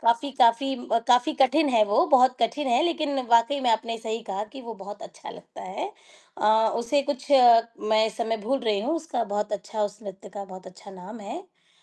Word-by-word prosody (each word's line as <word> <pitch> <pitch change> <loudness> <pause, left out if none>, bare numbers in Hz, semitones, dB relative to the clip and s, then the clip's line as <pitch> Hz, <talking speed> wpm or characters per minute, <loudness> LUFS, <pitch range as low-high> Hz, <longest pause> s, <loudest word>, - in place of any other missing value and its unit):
काफ़ी 235 +5 +1
काफ़ी 250 +3 +3
म 245 -2 -1
काफ़ी 245 +5 +4
कठिन 285 +4 +4
है 230 -5 +4
वो, 210 - +2
बहुत 255 -4 +4
कठिन 240 +5 -1
है 240 +4 +3
लेकिन 305 -5 -1
वाक़ई 235 +4 +3
में 245 -3 +1
आपने 230 +1 -1
सही 225 0 -5
कहा 200 -1 -4
कि 270 - -9
वो 230 -2 -8
बहुत 205 0 -10
अच्छा - - -11
लगता - - -13
है 390 - -6 0.5
अ, 220 +1 +3
उसे 275 +5 0
कुछ 285 +1 -6 0.6
मैं 220 0 +4
इस 220 0 -7
समय 225 -1 -1
भूल 275 +3 +1
रही 215 -4 0
हूँ 300 +9 -1
उसका 300 -8 -3
बहुत 210 0 -2
अच्छा 210 +1 -4
उस 205 0 -4
नृत्य 195 +1 -10
का 200 -1 -6
बहुत 185 -1 -12
अच्छा 185 +2 -13
नाम 195 +4 -11
है 210 +11 -7
अ, 370 -1 -25
230 Hz, 215 wpm, -25 LUFS, 210-270 Hz, 0.6 s, काफ़ी